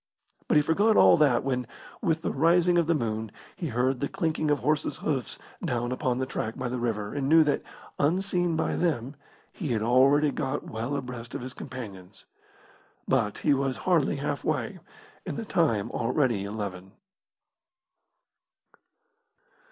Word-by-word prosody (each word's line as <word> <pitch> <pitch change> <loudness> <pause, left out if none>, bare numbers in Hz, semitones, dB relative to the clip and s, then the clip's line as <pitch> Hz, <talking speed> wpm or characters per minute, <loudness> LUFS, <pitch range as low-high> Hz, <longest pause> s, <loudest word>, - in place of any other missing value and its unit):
But - - +4
he 150 - +5
forgot 205 +8 +3
all - - +7
that 145 -6 +3
when, 125 -3 -1 0.3
with 165 -4 0
the - - 0
rising 170 +4 +3
of 165 - +1
the 170 - +3
moon, 110 -5 -2 0.2
he 170 - -4
heard 125 +1 0
the 140 - -2
clinking 155 -2 -1
of 145 - +3
horses' 150 +3 0
hoofs 140 -5 -2 0.3
down 120 -6 -1
upon 125 -1 -1
the 130 - -1
track 115 -3 -4
by 125 - -3
the 125 0 -3
river, 105 -4 -2
and 140 -1 -1
knew 160 +1 +7
that, 145 -1 0 0.4
unseen 175 +2 +1
by 160 - 0
them, 140 -6 -1 0.4
he 170 - -5
had 110 -1 0
already 135 +5 +4
got 130 - -2
well 115 +6 -3
abreast 125 -3 -6
of - - -4
his 130 +1 -6
companions. 100 -9 -9 0.8
But - - +1
he - - +5
was 135 -1 0
hardly 170 -6 +3
halfway, 140 -1 -2 0.4
and - - -5
the - - -4
time 105 -3 +1
already 120 -4 0
eleven. 100 -2 -6
135 Hz, 155 wpm, -27 LUFS, 120-155 Hz, 0.8 s, all